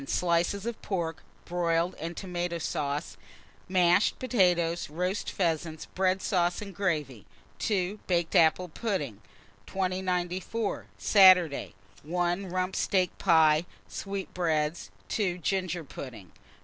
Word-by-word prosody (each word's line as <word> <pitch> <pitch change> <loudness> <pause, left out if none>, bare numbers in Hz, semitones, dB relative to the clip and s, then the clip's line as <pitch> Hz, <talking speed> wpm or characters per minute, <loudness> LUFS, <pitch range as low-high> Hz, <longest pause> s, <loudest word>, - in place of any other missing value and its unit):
Slices 175 +2 +1
of 235 -1 -4
pork, 170 -3 -3 0.2
broiled, 170 0 0
and 170 +2 -5
tomata 175 -2 -3
sauce, 145 0 -3 0.5
mashed 180 +1 +3
potatoes; 175 - +1
roast 180 +6 -2
pheasants, 160 -3 -1
bread 185 0 0
sauce, 175 -3 +1
and 200 -2 -7
gravy. 150 - -2 0.3
2. 200 -1 -1
Baked 170 -2 0
apple 165 +2 +4
pudding. 155 - -3 0.5
2094. 185 - -2
Saturday. 180 - +5 0.3
1. 175 +4 -1
Rump 185 +1 -1
steak 185 -2 +1
pie, 160 -2 +4 0.2
sweetbreads. 175 -5 -2 0.2
2. 185 -5 0
Ginger 180 -1 -1
pudding. 115 - -9
175 Hz, 105 wpm, -28 LUFS, 165-190 Hz, 0.5 s, Saturday